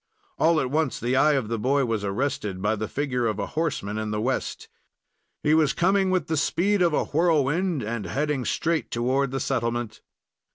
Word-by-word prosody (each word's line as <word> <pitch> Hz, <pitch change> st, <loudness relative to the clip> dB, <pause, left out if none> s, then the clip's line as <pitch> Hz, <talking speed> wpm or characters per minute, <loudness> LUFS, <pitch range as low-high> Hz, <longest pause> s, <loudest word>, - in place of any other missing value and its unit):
All 165 Hz, 0 st, +4 dB
at 130 Hz, -, -2 dB
once 155 Hz, -2 st, 0 dB
the 125 Hz, +2 st, 0 dB
eye 150 Hz, +3 st, +4 dB
of 135 Hz, -6 st, 0 dB
the 115 Hz, 0 st, -2 dB
boy 135 Hz, +4 st, +2 dB
was 110 Hz, -3 st, -2 dB
arrested 100 Hz, -2 st, -2 dB
by 105 Hz, +3 st, +1 dB
the 110 Hz, 0 st, -3 dB
figure 125 Hz, -3 st, -1 dB
of 110 Hz, -, -1 dB
a 100 Hz, -, -2 dB
horseman 150 Hz, -10 st, -2 dB
in 110 Hz, 0 st, -3 dB
the 105 Hz, 0 st, -2 dB
west. 130 Hz, +4 st, -2 dB, 0.8 s
He 150 Hz, -, +3 dB
was 155 Hz, -3 st, +3 dB
coming 190 Hz, +2 st, +2 dB
with 185 Hz, -5 st, +1 dB
the 160 Hz, -, -1 dB
speed 190 Hz, +7 st, +1 dB
of 170 Hz, -1 st, +4 dB
a -, -, +1 dB
whirlwind, 160 Hz, 0 st, +1 dB
and 110 Hz, -2 st, -4 dB
heading 140 Hz, -, -1 dB
straight 165 Hz, +5 st, -1 dB
toward 130 Hz, +3 st, 0 dB
the 135 Hz, +1 st, -3 dB
settlement. 120 Hz, -2 st, -2 dB
135 Hz, 195 wpm, -25 LUFS, 115-155 Hz, 0.8 s, All